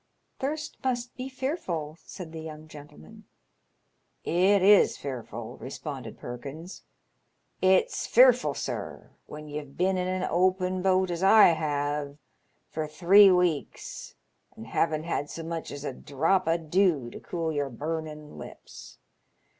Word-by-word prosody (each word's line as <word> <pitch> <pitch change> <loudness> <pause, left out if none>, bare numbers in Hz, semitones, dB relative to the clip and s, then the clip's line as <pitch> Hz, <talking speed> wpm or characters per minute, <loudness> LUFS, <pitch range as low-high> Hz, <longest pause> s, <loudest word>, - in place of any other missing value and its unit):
" - - -47
Thirst 295 +3 -4
must 245 -2 -2
be 255 +1 -6
fearful," 220 - -3
said 175 -4 -9
the 160 -1 -7
young 155 -1 -9
gentleman. 145 - -14 0.6
" - - -47 0.3
It 200 -2 +4
is 205 +1 +6
fearful," 130 -5 -7
responded - - -7
Perkins. 140 +9 -8 0.4
" - - -47
It's 190 - +2
fearful, - - +5
sir, - - -6 0.2
when 150 0 -9
ye've 145 -2 -7
been 185 +1 +1
in 180 - -1
an 185 0 -1
open 185 +1 +1
boat, 185 -1 +2
as 170 0 -3
I 200 +2 +7
have, 145 -2 -2 0.5
for 155 -1 -4
three 185 +7 +6
weeks, 180 -5 -1 0.4
and 110 - -10
havn't 155 +6 0
had 145 -3 -2
so 165 - -7
much 165 0 -5
as 145 0 -7
a 135 - -3
drop 160 +8 0
o' 165 +1 +3
dew 165 -6 +1
to - - -9
cool 165 -2 -3
your 145 -2 -1
burnin' 150 +3 -6
lips. - - -12
165 Hz, 145 wpm, -27 LUFS, 150-190 Hz, 0.6 s, I